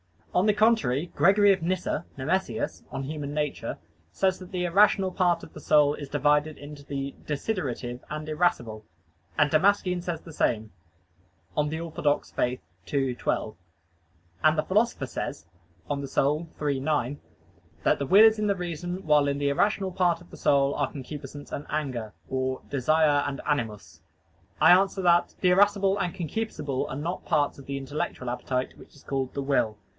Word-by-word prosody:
On 180 - +3
the 210 - +5
contrary, 200 - +2
Gregory 200 +2 +5
of 195 -2 +1
Nyssa 175 -2 -1
(Nemesius, 140 -4 -1
De 135 +3 -5
Nat. 145 0 -2
Hom.) - - -3 0.4
says 190 - +1
that 185 0 -11
the 180 -2 -2
irrational 190 +1 +4
part 180 -2 +1
of - - -12
the - - -9
soul 145 -1 +4
is 145 -2 -7
divided 150 +1 +2
into 145 0 -10
the 140 -1 -4
desiderative 140 - -3
and 155 0 -5
irascible, 120 -10 0 0.5
and 150 -1 +3
Damascene 180 +2 +3
says 170 -2 -4
the 165 - -12
same 110 -6 0 0.8
(De 160 +3 -1
Fide 155 - -4
Orth. 145 - +1 0.6
ii, 135 -3 +1
12). 110 -2 -2 0.9
And 155 0 +4
the 155 - +2
Philosopher 210 - +1
says 85 - -5 0.4
(De - - -1
Anima 140 +3 0 0.2
iii, 135 - -1
9) 145 -1 -1 0.6
"that - - +3
the 140 - -2
will 200 +7 +8
is 220 -1 +6
in 210 - +1
reason, 180 -1 -3
while 150 -2 +4
in 140 0 0
the 145 0 +1
irrational 195 +5 +1
part 175 -2 +1
of 175 - -17
the - - -10
soul 140 0 +3
are - - -1
concupiscence 145 0 -8
and 145 - -5
anger," 130 -8 -3
or 130 0 -2
"desire 145 +2 +3
and 140 0 -4
animus." 105 - -3 0.6
I - - +8
answer 190 +1 +4
that, 175 -1 +3
The 180 - +4
irascible 200 +1 +3
and 180 -1 -2
concupiscible 170 -7 -3
are - - -4
not 165 +6 -4
parts 145 -1 +1
of 135 - -12
the 140 0 -4
intellectual 135 -2 -4
appetite, 125 +1 -3
which - - -16
is 140 - -18
called 135 -2 -2
the 140 - -3
will. 125 -6 +1
150 Hz, 170 wpm, -27 LUFS, 140-180 Hz, 0.9 s, will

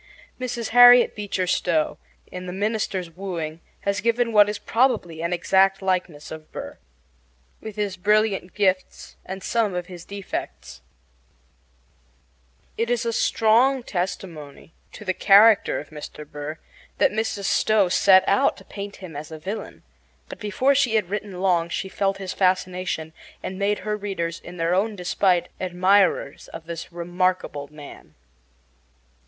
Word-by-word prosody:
Mrs. 240 -2 -3
Harriet 245 +1 +8
Beecher 200 -3 -2
Stowe, 170 -3 0 0.3
in 180 0 -7
The 180 - -5
Minister's 200 -3 -2
Wooing, 165 -3 -5 0.2
has 200 0 -1
given 230 +1 +1
what 205 -1 +6
is 210 - -3
probably 220 -10 0
an 170 +1 -2
exact 190 +2 +3
likeness 180 -5 -2
of 160 - -7
Aaron 155 - -31 0.2
Burr, - - -20 0.8
with 220 -2 -8
his 205 -3 -2
brilliant 205 -1 +1
gifts 190 -2 -1
and 190 0 -7
some 220 -5 0
of 180 -1 -3
his 175 -2 -10
defects. 200 -1 -7 2.0
It 230 +1 0
is 240 -1 0
strong 240 +4 +3
testimony 175 - -5 0.2
to 210 - -10
the 185 - 0
character 205 +3 +5
of - - -11 0.4
Burr 150 +2 -6 0.4
that - - +3
Mrs. 215 -1 -2
Stowe 215 -2 +3
set 190 +1 +5
out 200 - +3
to - - -15
paint 200 0 -7
him 180 -5 -10
as 150 +1 -7
a 160 - -7
villain; 195 +8 -7 0.5
but - - -9
before 230 +6 +1
she 265 -5 +2
had 200 -4 0
written 200 -3 -4
long 175 -3 +2
she 190 +2 -3
felt 195 0 -1
his 190 -2 -5
fascination 185 -3 -1 0.3
and 190 +1 -5
made 205 +1 +1
her 210 0 0
readers, 190 -5 -4
in 175 +1 -11
their 165 +1 0
own 205 +4 +1
despite, 180 -1 +1
admirers 185 +2 +2
of 165 - -10
this 170 0 -7
remarkable 175 -4 -1
man. 150 -2 -13
190 Hz, 145 wpm, -23 LUFS, 175-210 Hz, 2.0 s, Harriet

